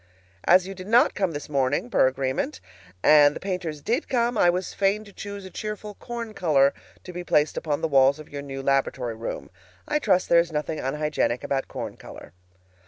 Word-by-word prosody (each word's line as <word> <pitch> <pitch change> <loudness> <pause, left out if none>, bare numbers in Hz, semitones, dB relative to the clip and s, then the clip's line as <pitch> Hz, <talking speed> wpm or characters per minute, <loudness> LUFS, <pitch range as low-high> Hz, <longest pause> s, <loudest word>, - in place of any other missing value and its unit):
As 180 +1 +5
you 195 - -6
did 185 0 -10
not 240 +6 +4
come 190 -4 -1
this 145 - -6
morning, 140 -2 0
per 130 - +3
agreement, 130 - -2 0.4
and 145 -1 +6
the - - -5
painters 175 -6 -4
did 245 +8 -1
come, 240 -2 +1
I 175 -5 +4
was 180 +1 -2
fain 200 +2 +1
to 200 -2 -15
choose 200 -1 -7
a 190 - -10
cheerful 210 +1 -6
corn 235 0 -7
color 145 -8 +3 0.3
to 180 - -9
be 180 0 -5
placed 150 -3 +2
upon 150 -3 -2
the - - +1
walls 135 -1 +4
of 155 - -11
your 145 -1 -7
new 135 -1 -7
laboratory 135 -3 0
room. 115 +1 -6 0.4
I 300 0 +1
trust 185 -10 +2
there 170 - +5
is 170 0 0
nothing 150 +1 -3
unhygienic 150 -3 -1
about 135 -1 -1
corn - - -6
color. - - -12
165 Hz, 200 wpm, -25 LUFS, 140-200 Hz, 0.4 s, and